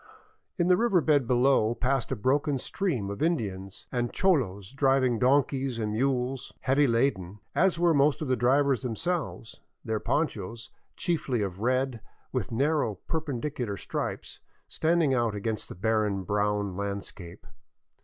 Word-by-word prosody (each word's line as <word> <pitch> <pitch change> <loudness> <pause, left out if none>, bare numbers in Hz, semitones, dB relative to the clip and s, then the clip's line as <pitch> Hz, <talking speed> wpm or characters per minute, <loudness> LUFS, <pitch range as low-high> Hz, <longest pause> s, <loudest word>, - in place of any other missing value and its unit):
In 175 -2 +2
the 180 0 +5
river 225 -5 +3
bed 145 -6 +2
below 125 -2 +3
passed 130 0 0
a - - +1
broken 140 +5 +1
stream 130 - -2
of 100 - -7
Indians 100 - -2
and 120 -1 -1
cholos 115 - +1
driving 135 -3 +2
donkeys 135 -1 +2
and 110 -2 -2
mules, 130 +2 -1
heavy 140 +2 +3
laden, 115 -6 0 0.2
as 190 -1 +3
were 170 -1 +3
most 145 0 +3
of 155 - -3
the 130 - +2
drivers 135 +2 +2
themselves, 130 0 -3 0.3
their 110 -1 -1
ponchos, 115 - -2 0.2
chiefly 145 - -1
of 95 -1 -5
red 130 0 0 0.3
with - - -2
nar 140 +7 +2
row 110 -8 -1
perpendicular 135 - -3
stripes, - - -5 0.3
standing 160 -3 +2
out 120 -4 +1
against 110 +1 -3
the - - -8
barren 105 0 0
brown 105 0 0
land 100 0 -3
scape. 85 -3 -9
125 Hz, 145 wpm, -28 LUFS, 105-145 Hz, 0.3 s, the